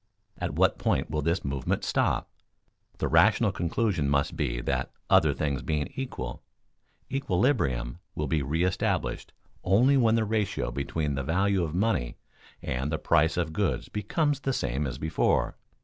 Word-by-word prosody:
At - - -3
what - - +3
point - - 0
will 75 0 0
this 85 +3 0
movement 70 -1 -1
stop? - - +1 0.7
The - - -1
rational - - +4
conclusion 85 -4 0
must 70 0 +1
be - - -1
that - - -1 0.2
"other 75 - +6
things 70 0 -2
being 75 -2 -2
equal" 65 - -5 0.7
equilibrium 90 - 0 0.2
will 75 - -1
be 75 +1 0
reëstablished 80 +7 -1 0.4
only 125 +10 +4
when 115 -3 +4
the 115 -1 +2
ratio 105 -2 -1
between 75 +1 -2
the 70 0 -2
value 95 +5 +1
of 80 0 -3
money 95 - 0 0.5
and 65 +4 -2
the 80 - 0
price 80 +1 +2
of 80 -3 -1
goods 80 -10 -1
becomes 145 - 0
the 135 -1 -1
same 70 - -1
as 65 0 -5
before. 80 +2 +1
80 Hz, 150 wpm, -28 LUFS, 70-105 Hz, 0.7 s, other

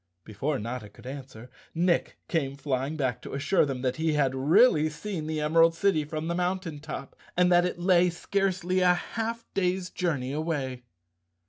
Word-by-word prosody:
Before 135 - -2
Notta 115 -1 -5
could 105 - -17
answer 130 -3 -9 0.2
Nick 175 +1 +1
came 140 -5 -1
flying 140 +1 -2
back 130 -6 -1
to - - -7
assure 150 +3 +2
them 130 -2 -4
that 130 -1 0
he 160 0 +1
had 140 -3 +2
really 155 - +4
seen 160 0 -5
the 155 -1 -2
Emerald 165 +2 +4
City 165 -4 +2
from 155 +1 -4
the 170 - 0
mountain 180 -3 -2
top 145 -3 -7 0.2
and 180 0 +4
that 175 0 +5
it 180 - -2
lay 180 0 +4
scarcely 185 0 0
a 180 -1 +5
half 230 +5 -4
day's 180 -1 0
journey 140 -7 -1
away. 140 -6 -3
160 Hz, 170 wpm, -27 LUFS, 135-180 Hz, 0.2 s, that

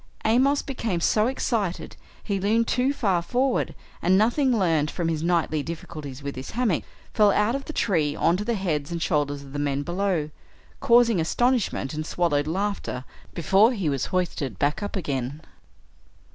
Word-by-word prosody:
Amos 265 +6 +3
became 230 -9 -2
so 215 +6 +2
excited 225 -8 -2 0.3
he 200 -2 -1
leaned 225 +4 +2
too 255 +2 +2
far 195 -10 +1
forward, 250 +8 0 0.3
and, 185 +2 +4
nothing 240 +6 +3
learned 165 -9 +2
from 170 0 -2
his 160 -2 -1
nightly 165 -3 +1
difficulties 150 -3 -7
with 140 0 -4
his 130 +1 -7
hammock, 230 -8 0 0.3
fell 210 -2 +5
out 210 +3 +2
of 275 +1 -3
the - - -5
tree 160 - +1
onto 180 +5 +1
the 235 +2 -1
heads 160 -7 -2
and 170 - -2
shoulders 145 -4 0
of 135 -1 -13
the 145 - -3
men 145 -1 -1
below, 175 -3 -1 0.5
causing 235 -5 +4
astonishment 235 - 0
and 155 +1 -4
swallowed 150 -4 0
laughter 185 -7 -2 0.3
before 195 - +4
he 195 -9 -1
was 140 -2 -1
hoisted 165 - -2
back 145 +7 0
up 205 - -4
again. 140 -5 -3
180 Hz, 165 wpm, -25 LUFS, 150-220 Hz, 0.5 s, fell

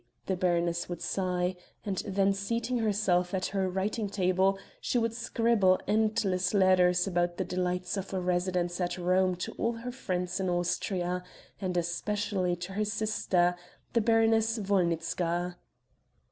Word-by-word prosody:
the 190 - 0
baroness 175 -1 0
would 175 -2 -4
sigh; 180 +1 -1 0.3
and 195 -3 -2
then 195 0 +2
seating 230 +5 -1
herself 195 -4 +1
at 185 0 -1
her 190 -1 +1
writing 200 +3 -1
table 190 0 +2 0.2
she - - -1
would 230 -1 +1
scribble 225 -5 +2
endless 210 -3 +1
letters 180 -2 +4
about 175 -2 0
the 190 - 0
delights 180 0 -2
of 195 0 -4
a 190 - -1
residence 180 0 0
at 175 0 -1
Rome 185 +1 +2
to 180 - -4
all 230 - +1
her 235 +2 -6
friends 185 -7 -3
in 190 -1 0
Austria, 180 +1 -1 0.4
and 185 -2 -2
especially 185 +1 -1
to 180 +2 -7
her 210 +2 0
sister, 205 -5 +1 0.4
the 230 - +3
Baroness 225 0 +3
Wolnitzka. 175 -2 0
185 Hz, 145 wpm, -29 LUFS, 180-210 Hz, 0.4 s, letters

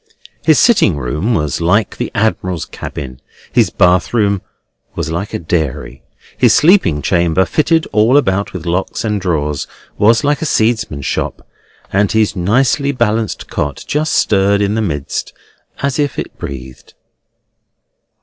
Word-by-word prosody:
His 155 -2 +4
sitting 200 - +4
room 75 - -1
was 75 -2 -1
like 100 +6 +1
the - - -3
admiral's 95 -5 -1
cabin, 65 -2 -8 0.3
his - - +3
bath 90 +5 +2
room 100 -4 +2 0.5
was - - -3
like 95 +5 -3
a - - -2
dairy, 80 -6 -3 0.3
his - - +4
sleeping 145 - +4
chamber, 85 +1 +2
fitted 160 +1 +1
all 110 +6 +4
about 100 -7 +1
with 90 -3 -7
lockers 90 +6 -2
and 105 -2 -1
drawers, 75 -5 -1 0.3
was 115 +2 +4
like 145 0 +1
a 160 - -1
seedsman's 110 - 0
shop; - - -3 0.5
and 100 +3 +2
his 110 -1 +2
nicely 125 +9 +1
balanced 115 -4 -1
cot 70 -1 -3
just 155 +2 -1
stirred 100 0 +2
in 100 0 +1
the 110 - 0
midst, 75 -9 -3 0.5
as 140 +1 -1
if 145 -1 -1
it - - -5
breathed. 65 -2 -9
100 Hz, 145 wpm, -15 LUFS, 80-115 Hz, 0.5 s, His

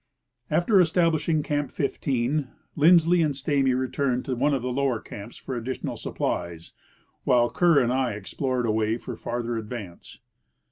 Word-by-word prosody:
After 175 +6 +4
establishing 160 -2 +2
Camp 145 -2 -1
15, 135 0 -1 0.3
Lindsley 170 +2 +5
and 150 -3 +1
Stamy 135 -2 +1
returned 130 0 -1
to 130 - -2
one 140 +5 +2
of 135 -4 -1
the 125 - -2
lower 130 -2 0
camps 105 +1 -10
for 130 - -6
additional 125 +2 -4
supplies, 85 -1 -4 0.5
while 120 -1 +3
Kerr 170 +3 +4
and 125 -2 +3
I 130 -3 0
explored 125 +5 -2
a 110 - +1
way 110 +1 0
for - - -7
farther 120 -1 -3
advance. 105 -5 -8
130 Hz, 150 wpm, -25 LUFS, 120-150 Hz, 0.5 s, Lindsley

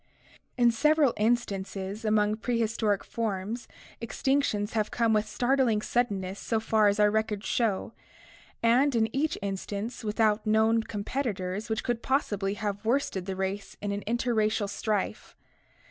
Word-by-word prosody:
In 240 -1 +5
several 300 +2 +3
instances 205 -2 -1
among 215 -1 +2
prehistoric 225 -3 0
forms 220 +1 -3 0.3
extinctions 230 -3 0
have 215 -1 0
come 230 -2 +1
with 215 0 +2
startling 240 -1 +1
suddenness 200 -5 -1
so 225 - -1
far 220 -1 +3
as 205 +1 +2
our 210 0 +5
records 220 -1 -1
show, 225 -2 0 0.7
and 250 +4 +4
in 225 0 +1
each 310 +4 0
instance 200 +4 -4
without 215 0 +1
known 220 +1 +4
competitors 205 -3 -3
which 220 0 -1
could 240 -2 -1
possibly 205 -8 0
have 205 -1 -3
worsted 225 -6 0
the 190 - -2
race 190 +1 -4
in 205 - -3
an 200 0 -2
interracial 220 -3 +1
strife. 205 0 -3
220 Hz, 135 wpm, -28 LUFS, 205-235 Hz, 0.7 s, In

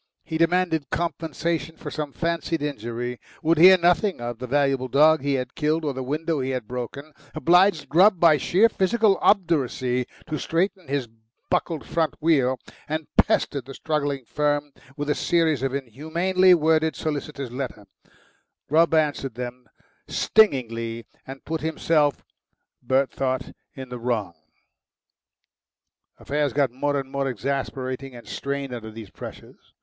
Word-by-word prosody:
He 160 -1 -4
demanded 165 -4 +1
compensation 165 -1 -2
for - - -7
some 150 -2 -4
fancied 165 0 -2
injury, 120 -3 -4 0.2
would 160 0 +3
hear 185 +2 +9
nothing 175 - +2
of 120 -1 -5
the 125 - -5
valuable 135 -1 +1
dog 155 +4 +5
he 140 0 0
had 125 -1 -3
killed 155 +1 0
or 145 - -1
the 130 - -5
window 155 +4 -2
he 130 0 -2
had 130 -4 -3
broken, 125 +5 -6 0.2
obliged 175 +1 +4
Grubb 185 +4 +5
by 165 -3 +6
sheer 195 +9 +4
physical 215 0 +2
obduracy 135 - +1 0.2
to 155 -2 -4
straighten 185 +1 -1
his 135 -2 -1 0.4
buckled 165 -3 -1
front 160 -3 0
wheel, 135 -5 +2 0.3
and 155 0 -2
pestered 140 -4 +2
the 135 0 -9
struggling 145 -4 -2
firm 145 +2 -1 0.3
with 145 0 -3
a 150 - +2
series 160 -6 +1
of 135 0 -1
inhumanly 170 - +2
worded 160 0 +2
solicitor's 145 -4 -4
letters. 125 -5 -5 0.8
Grubb 165 +2 +3
answered 145 -5 0
them 125 0 -7 0.4
stingingly, 115 - +1 0.2
and 135 0 -9
put 160 +1 -3
himself, 155 -2 +1 0.6
Bert 130 +2 +1
thought, 130 -1 -2 0.2
in 130 -2 -8
the 125 -1 -6
wrong. 115 -7 -2 1.8
Affairs 145 -2 -1
got 140 -3 +2
more 145 +3 -1
and 135 -1 -7
more 140 -1 -1
exasperating 130 +2 -4
and 120 - -12
strained 140 -1 -4
under 115 -2 -6
these 110 -2 -10
pressures. - - -12
145 Hz, 145 wpm, -24 LUFS, 130-160 Hz, 1.8 s, hear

